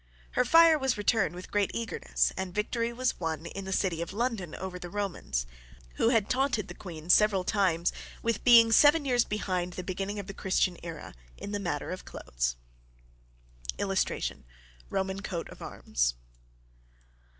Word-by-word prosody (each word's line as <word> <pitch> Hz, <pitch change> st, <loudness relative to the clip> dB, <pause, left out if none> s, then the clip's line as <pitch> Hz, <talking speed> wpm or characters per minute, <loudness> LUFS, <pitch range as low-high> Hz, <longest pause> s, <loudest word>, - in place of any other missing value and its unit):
Her 250 Hz, -, +2 dB
fire 330 Hz, +4 st, +6 dB
was 265 Hz, -4 st, 0 dB
returned 205 Hz, -4 st, +1 dB
with 180 Hz, -, -9 dB
great 205 Hz, -2 st, +2 dB
eagerness, 230 Hz, -1 st, 0 dB
and 190 Hz, -2 st, -4 dB
victory 230 Hz, +2 st, -1 dB
was 250 Hz, +1 st, -1 dB
won 160 Hz, -2 st, -3 dB
in 195 Hz, +3 st, -6 dB
the 190 Hz, -, -5 dB
city 185 Hz, -3 st, 0 dB
of 170 Hz, -, -5 dB
London 220 Hz, -7 st, -2 dB
over 185 Hz, -1 st, -6 dB
the 175 Hz, -, -7 dB
Romans, 180 Hz, -, -2 dB, 0.5 s
who 225 Hz, -, +3 dB
had 225 Hz, -4 st, +2 dB
taunted 255 Hz, -5 st, 0 dB
the 175 Hz, -, -8 dB
queen 165 Hz, -4 st, -9 dB
several 205 Hz, -3 st, +5 dB
times 180 Hz, -4 st, +1 dB, 0.3 s
with 230 Hz, -2 st, -1 dB
being 230 Hz, -2 st, +8 dB
seven 290 Hz, +5 st, +6 dB
years 245 Hz, -3 st, +3 dB
behind 185 Hz, -4 st, -2 dB
the 185 Hz, -, -5 dB
beginning 195 Hz, +3 st, -3 dB
of 200 Hz, -, -4 dB
the 195 Hz, -, -7 dB
Christian 185 Hz, -1 st, +1 dB
Era 165 Hz, -2 st, -8 dB, 0.2 s
in 205 Hz, -, -7 dB
the 205 Hz, -, -2 dB
matter 170 Hz, -7 st, -3 dB
of 185 Hz, -, -6 dB
clothes. -, -, -3 dB, 1.2 s
[Illustration: -, -, -1 dB, 0.5 s
ROMAN 190 Hz, 0 st, -1 dB
COAT 180 Hz, -4 st, -4 dB
OF -, -, -13 dB
ARMS. -, -, -1 dB
195 Hz, 160 wpm, -29 LUFS, 175-230 Hz, 1.2 s, being